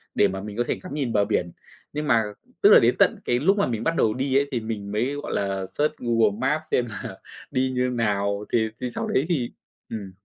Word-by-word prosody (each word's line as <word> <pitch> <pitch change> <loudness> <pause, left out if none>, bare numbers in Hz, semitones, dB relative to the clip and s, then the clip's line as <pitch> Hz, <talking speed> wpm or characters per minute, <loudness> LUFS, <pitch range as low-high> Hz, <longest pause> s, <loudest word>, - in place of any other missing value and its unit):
để 100 - +5
mà 95 0 -4
mình 105 +2 -7
có 120 - +2
thể - - -1
ngắm 185 - -7
nhìn 135 -6 -2
bờ 100 -1 +3
biển, 90 -5 -1 0.4
nhưng 150 0 -3
mà 115 -3 +4 0.4
tức - - +7
là - - +10
đến - - +3
tận - - +4
cái 120 0 +2
lúc 195 +8 +3
mà 200 - +2
mình 115 -2 -2
bắt 165 +5 +1
đầu 110 - +2
đi 135 +2 +1
ấy 140 - +2
thì 120 - 0
mình 110 -3 -5
mới, 120 +7 0
gọi 145 - -5
là, 95 -1 -1
search 150 +1 +1
Google 115 -3 +2
Maps 150 +4 +1
xem 125 - +2
là 100 - -7 0.3
đi 130 0 +1
như 125 0 +1
nào, 105 -3 0
thì 110 -2 +2
thì 125 - -2
sau - - -3
đấy 135 - +1
thì 130 -8 0 0.4
ừm. 100 -4 -6
115 Hz, 245 wpm, -24 LUFS, 105-130 Hz, 0.4 s, là